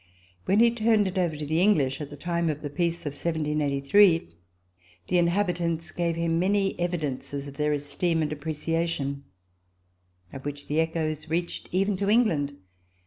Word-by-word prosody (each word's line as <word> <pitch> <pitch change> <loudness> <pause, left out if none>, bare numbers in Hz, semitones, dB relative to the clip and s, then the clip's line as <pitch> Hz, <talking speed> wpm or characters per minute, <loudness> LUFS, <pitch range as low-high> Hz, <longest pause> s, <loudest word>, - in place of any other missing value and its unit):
When 200 +4 +3
he 235 0 +6
turned 220 -3 +2
it 190 0 -2
over 170 -4 0
to 150 - -4
the 160 +3 +1
English, 150 -9 +2
at 145 - -5
the 145 - -10
time 170 +2 -1
of 150 0 -3
the 145 - -4
peace 170 +2 -1
of 145 - -3
1783, 150 - +2 0.8
the 180 - +3
in 170 - +3
habitants 170 -3 -1
gave 170 -1 -1
him 165 0 0
many 195 +1 +2
evidences 145 -5 -3
of 140 0 -10
their 150 0 +1
esteem 150 +3 0
and 150 - -2
appreciation, 150 -2 -2 1.1
of 135 - -8
which 145 0 -5
the 150 +2 0
echoes 160 -1 -1
reached 170 +2 -2
even 195 +2 +1
to 200 +1 -1
England. 165 -12 +2
165 Hz, 165 wpm, -26 LUFS, 145-180 Hz, 1.1 s, he